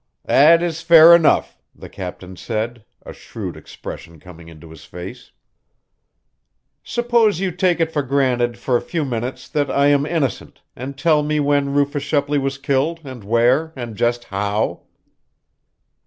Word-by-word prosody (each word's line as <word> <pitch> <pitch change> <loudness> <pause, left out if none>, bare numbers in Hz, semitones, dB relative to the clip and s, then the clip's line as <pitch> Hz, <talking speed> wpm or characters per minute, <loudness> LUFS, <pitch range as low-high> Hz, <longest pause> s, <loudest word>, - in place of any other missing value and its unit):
"That 165 +5 +5
is 165 -2 -3
fair 165 0 +8
enough," 170 -2 +3 0.2
the - - -11
captain 90 0 -8
said, 115 +2 -4 0.2
a - - -9
shrewd - - -8
expression 85 -1 -10
coming 85 0 -14
into 80 0 -14
his 80 -3 -13
face. 90 +1 -10 1.5
"Suppose 235 -5 +1
you 190 -1 -1
take 180 0 0
it 165 -1 0
for 150 -3 -1
granted, 125 -3 0
for 125 +1 -1
a - - +1
few 165 -4 -3
minutes, 120 0 -5
that 145 -2 -1
I 140 +1 +2
am 145 0 +2
innocent, 155 -6 -3
and 135 +2 -7
tell 155 0 +2
me 150 +1 -1
when 140 -1 0
Rufus 145 0 0
Shepley 145 0 0
was 135 0 -3
killed, 140 +4 -1
and 130 -5 -9
where, 120 +9 +1
and 120 -4 -7
just 120 +2 0
how." 100 +2 -3
140 Hz, 155 wpm, -19 LUFS, 120-155 Hz, 1.5 s, fair